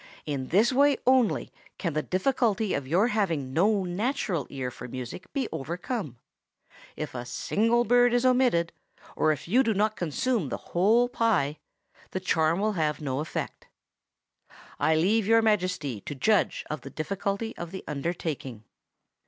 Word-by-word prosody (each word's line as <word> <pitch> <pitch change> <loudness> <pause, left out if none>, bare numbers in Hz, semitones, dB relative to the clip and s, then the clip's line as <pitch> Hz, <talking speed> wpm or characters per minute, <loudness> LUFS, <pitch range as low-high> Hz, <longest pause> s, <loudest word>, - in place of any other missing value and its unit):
In 140 -3 -3
this 215 - +3
way 285 +2 +4
only 255 -4 +3 0.3
can 170 -4 -2
the 155 - 0
difficulty 220 - 0
of 140 -2 -2
your 185 - +3
having 165 - -1
no 200 +5 +3
natural 185 - -2
ear 130 -2 -4
for 125 - -9
music 130 +8 -7
be 270 -4 -1
overcome. 170 - -4 0.8
If 155 -4 -5
a 120 -1 -4
single 230 - +1
bird 245 +1 +4
is 245 +1 +2
omitted, 250 -10 +3 0.4
or 155 - +3
if 155 - -4
you 240 +9 +4
do 225 -5 +1
not 215 +2 +1
consume 195 - -1
the - - -3 0.2
whole 220 +8 +4
pie, 205 - +1 0.5
the 185 - -3
charm 165 -2 +1
will 215 +1 +1
have 155 -4 0
no 135 -3 -2
effect. 155 - -5 1.1
I 160 - +3
leave 200 +6 +2
Your 225 0 +5
Majesty 180 - 0
to 145 - -4
judge 210 +8 +1
of 155 - -4
the 135 - -9
difficulty 200 +8 -3
of 170 - -6
the 190 +2 -7
undertaking." 140 -6 -4
185 Hz, 155 wpm, -27 LUFS, 155-225 Hz, 1.1 s, Your